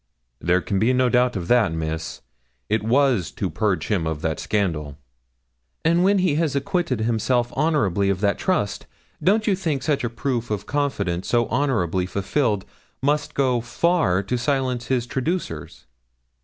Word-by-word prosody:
'There 90 Hz, +1 st, +2 dB
can 95 Hz, +2 st, -1 dB
be 115 Hz, +5 st, +3 dB
no 130 Hz, 0 st, +3 dB
doubt 125 Hz, 0 st, +2 dB
of 90 Hz, -3 st, -3 dB
that, 115 Hz, -6 st, +4 dB
Miss; 80 Hz, 0 st, -4 dB, 0.5 s
it 110 Hz, +1 st, +1 dB
was 120 Hz, -, +2 dB
to -, -, -3 dB
purge 105 Hz, -4 st, 0 dB
him 90 Hz, -7 st, 0 dB
of 80 Hz, -2 st, -4 dB
that 80 Hz, -1 st, -1 dB
scandal.' 80 Hz, -9 st, -1 dB, 0.9 s
'And 170 Hz, +2 st, +4 dB
when 200 Hz, +2 st, +4 dB
he 180 Hz, -5 st, +2 dB
has 155 Hz, -4 st, 0 dB
acquitted 140 Hz, -, -1 dB
himself 120 Hz, +2 st, 0 dB
honourably 105 Hz, -, +1 dB
of 95 Hz, -2 st, 0 dB
that 100 Hz, 0 st, +1 dB
trust, 180 Hz, -, -1 dB, 0.4 s
don't 215 Hz, +3 st, +3 dB
you 205 Hz, -, +3 dB
think 160 Hz, -7 st, -2 dB
such 150 Hz, -4 st, 0 dB
a 120 Hz, -, 0 dB
proof 120 Hz, 0 st, -2 dB
of 105 Hz, -1 st, -3 dB
confidence 100 Hz, -11 st, -1 dB
so 120 Hz, -1 st, +2 dB
honourably 110 Hz, -, 0 dB
fulfilled 100 Hz, +2 st, 0 dB, 0.4 s
must 145 Hz, +1 st, 0 dB
go 130 Hz, -3 st, +2 dB
far 120 Hz, -, +1 dB
to 120 Hz, +5 st, -2 dB
silence 130 Hz, -2 st, -1 dB
his 125 Hz, -3 st, 0 dB
traducers?' 130 Hz, -, -4 dB
120 Hz, 160 wpm, -23 LUFS, 95-140 Hz, 0.9 s, that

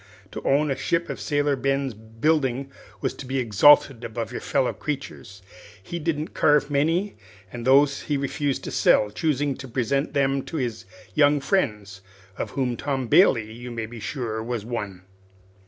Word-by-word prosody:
To -, -, -6 dB
own 145 Hz, +1 st, +2 dB
a -, -, 0 dB
ship 170 Hz, +6 st, -1 dB
of -, -, -6 dB
Sailor 145 Hz, -1 st, +1 dB
Ben's 135 Hz, 0 st, -1 dB
building 130 Hz, +5 st, -1 dB, 0.3 s
was -, -, -1 dB
to 130 Hz, -, -9 dB
be 135 Hz, +1 st, -2 dB
exalted 125 Hz, +2 st, +5 dB
above 115 Hz, 0 st, -4 dB
your -, -, -5 dB
fellow 135 Hz, -3 st, 0 dB
creatures. 120 Hz, -9 st, -6 dB, 0.4 s
He 170 Hz, -, -5 dB
didn't 155 Hz, -1 st, -2 dB
carve 145 Hz, -1 st, +3 dB
many, 165 Hz, +8 st, +1 dB, 0.4 s
and 120 Hz, 0 st, -5 dB
those 140 Hz, +1 st, +4 dB
he 145 Hz, -, -1 dB
refused 140 Hz, 0 st, -2 dB
to -, -, -5 dB
sell, 105 Hz, -1 st, +3 dB
choosing 145 Hz, +1 st, 0 dB
to 135 Hz, -, -8 dB
present 135 Hz, +4 st, -1 dB
them 135 Hz, -1 st, +2 dB
to 165 Hz, -, -5 dB
his 115 Hz, -5 st, -3 dB, 0.3 s
young 145 Hz, +6 st, +4 dB
friends, 105 Hz, -, -1 dB, 0.3 s
of -, -, -4 dB
whom 130 Hz, -3 st, -1 dB
Tom 135 Hz, 0 st, -2 dB
Bailey, 115 Hz, -, +4 dB
you 120 Hz, +2 st, -8 dB
may 115 Hz, -2 st, -4 dB
be 115 Hz, +1 st, -10 dB
sure, 110 Hz, -1 st, -4 dB
was 115 Hz, -2 st, -4 dB
one. 100 Hz, -6 st, -5 dB
135 Hz, 170 wpm, -24 LUFS, 115-145 Hz, 0.4 s, exalted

